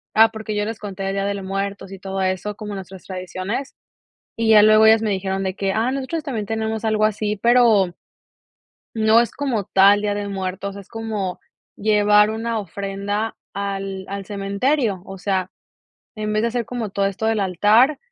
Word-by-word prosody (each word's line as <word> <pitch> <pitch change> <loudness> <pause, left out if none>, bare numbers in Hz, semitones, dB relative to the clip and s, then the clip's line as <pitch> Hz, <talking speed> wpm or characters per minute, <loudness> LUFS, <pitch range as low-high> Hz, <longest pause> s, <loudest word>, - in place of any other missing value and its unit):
ah, 225 +1 +7
porque 220 -1 -5
yo 210 0 0
les 225 0 -5
conté 195 -2 -6
del 195 0 -1
día 195 0 -1
de 200 0 -1
los 195 -1 -6
muertos 195 0 -4
y 195 - -9
todo 195 0 -3
eso 185 +2 -2
como 210 -1 -7
nuestras 190 -1 -9
tradiciones, 185 +7 -5 0.6
y 225 -1 +2
ya 210 -1 +8
luego 215 +1 +6
ellas 220 0 +6
me 215 - 0
dijeron 190 0 -2
de 190 -1 -2
que: 195 -1 -1
"Ah, 225 +4 +1
nosotros 275 +4 -3
también 230 -8 -4
tenemos 220 0 -2
algo 215 -1 +2
así", 210 0 0
pero, 230 -7 +4 1.0
no 220 +1 +5
es 235 - 0
como 260 -8 -2
tal 200 +2 +5
día 205 -1 0
de 205 0 -3
muertos, 195 0 -4
es 200 -1 -11
como 220 -5 -4 0.4
llevar 210 0 +4
una 225 +1 -2
ofrenda 200 +3 -3 0.2
al 195 -1 -4
al 200 0 -5
cementerio, 205 +2 0
o 195 - -8
sea, 185 -1 -1 0.7
en 215 -1 -3
vez 215 - +1
de 235 - +2
hacer 235 0 -2
como 235 -3 -4
todo 195 +1 0
esto 200 +3 -4
del 225 -1 +1
altar, 210 - +4
205 Hz, 190 wpm, -21 LUFS, 195-220 Hz, 1.0 s, ya